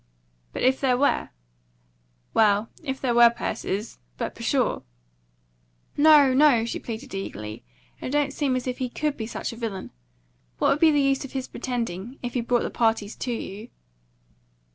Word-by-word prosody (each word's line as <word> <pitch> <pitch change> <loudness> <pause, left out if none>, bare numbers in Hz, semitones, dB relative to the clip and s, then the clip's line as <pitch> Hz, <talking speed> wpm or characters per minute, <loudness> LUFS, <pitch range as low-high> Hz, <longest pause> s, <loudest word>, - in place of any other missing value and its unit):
"But - - -4
if 260 +1 +3
there 255 -2 +3
were?" 285 +2 +1 1.0
"Well, 210 0 +3
if 265 -3 -3
there 250 -3 0
were, 235 0 +8
Persis 215 -2 -4 0.2
But - - -3
pshaw!" - - 0 1.1
"No, 290 -3 +6
no!" 260 -5 +5
she 235 - -4
pleaded 245 +3 -7
eagerly. 105 - -6 0.4
"It - - -4
don't 285 0 +1
seem 280 -4 0
as 255 - -2
if 250 0 -3
he 255 -1 -2
COULD 300 +3 -2
be 220 - -5
such 235 - -4
a - - -11
villain. 220 -5 -5 0.7
What - - +2
would 285 - +2
be 325 - +6
the 295 -1 +3
use 275 0 +2
of 275 - -9
his 265 -1 -3
pretending? 235 -1 -4
If 245 - -4
he 245 - 0
brought 240 +1 +1
the - - -3
parties 225 -2 0
to 250 - -3
you." 220 0 -6
245 Hz, 170 wpm, -25 LUFS, 225-275 Hz, 1.1 s, were